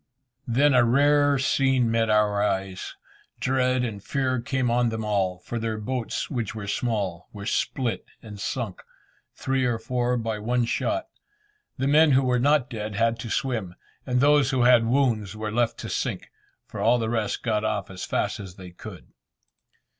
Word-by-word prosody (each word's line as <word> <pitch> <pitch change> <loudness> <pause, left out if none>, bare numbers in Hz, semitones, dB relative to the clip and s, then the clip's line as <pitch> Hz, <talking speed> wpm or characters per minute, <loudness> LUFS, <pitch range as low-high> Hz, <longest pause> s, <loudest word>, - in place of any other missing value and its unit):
Then 140 +5 +3
a 125 -1 +5
rare 145 +3 +4
scene 130 -2 +2
met 115 -1 +1
our 105 -1 +3
eyes: 95 -2 -2 0.4
dread 130 -1 +1
and 105 -5 -4
fear 130 -2 -1
came 125 0 -1
on 120 0 +2
them 110 -1 -4
all, 95 -3 0
for 115 +6 -5
their 110 -1 -2
boats, 120 +2 -3
which 120 -7 -3
were 110 -2 -5
small, 100 -5 -2
were 100 -1 -8
split 125 +1 -1 0.2
and 105 -2 -11
sunk 110 -3 -4 0.5
three 135 0 -1
or 120 -2 +1
four 125 +1 -1
by 110 -2 -3
one 120 +3 0
shot. 320 - -1 0.7
The 135 0 0
men 150 +1 +5
who 135 +1 +4
were 125 -1 +2
not 145 0 +3
dead 110 -5 -5
had 115 +1 +1
to 115 - -6
swim, 110 -9 -2 0.3
and 125 -1 0
those 145 -2 +4
who 130 -3 +1
had 120 -2 +5
wounds 115 -6 +1
were 110 0 -4
left 120 +1 0
to - - -6
sink, - - -3 0.3
for - - -9
all 120 +2 +4
the 115 -2 -2
rest 110 -2 -2
got 110 -3 0
off 105 -3 -2
as 90 -1 -7
fast - - -1
as 95 -3 -9
they 90 -2 -11
could. 90 - -12
115 Hz, 175 wpm, -25 LUFS, 105-130 Hz, 0.7 s, a